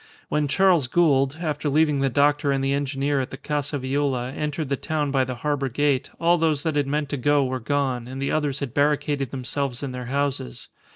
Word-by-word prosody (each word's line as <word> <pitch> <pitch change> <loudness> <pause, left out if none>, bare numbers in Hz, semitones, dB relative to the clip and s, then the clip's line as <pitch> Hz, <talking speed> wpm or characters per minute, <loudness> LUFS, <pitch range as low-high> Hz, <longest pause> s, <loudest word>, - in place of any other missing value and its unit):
When 150 -1 +1
Charles 170 -2 +3
Gould, 140 -2 +2
after 150 -2 -1
leaving 150 0 +3
the 135 0 +2
doctor 145 +1 +2
and 135 -1 0
the 135 0 +1
engineer 140 0 0
at 130 - -4
the - - -8
Casa 150 0 -2
Viola, 130 -2 -1
entered 150 +1 -3
the 140 - +1
town 150 0 -2
by 135 -1 +2
the 130 0 -4
harbour 145 -2 0
gate, 140 +1 +1
all 170 +1 +3
those 155 -3 +1
that 160 -3 -1
had 145 -2 +1
meant 145 0 -1
to 145 - -2
go 145 +2 +3
were 130 0 -2
gone, 130 -2 -1
and 130 +1 -7
the 140 - -1
others 145 -3 -1
had 135 -4 -4
barricaded 145 -2 +1
themselves 135 0 -3
in 135 - -3
their 125 0 -6
houses. 135 - -3
140 Hz, 215 wpm, -24 LUFS, 135-150 Hz, -, Charles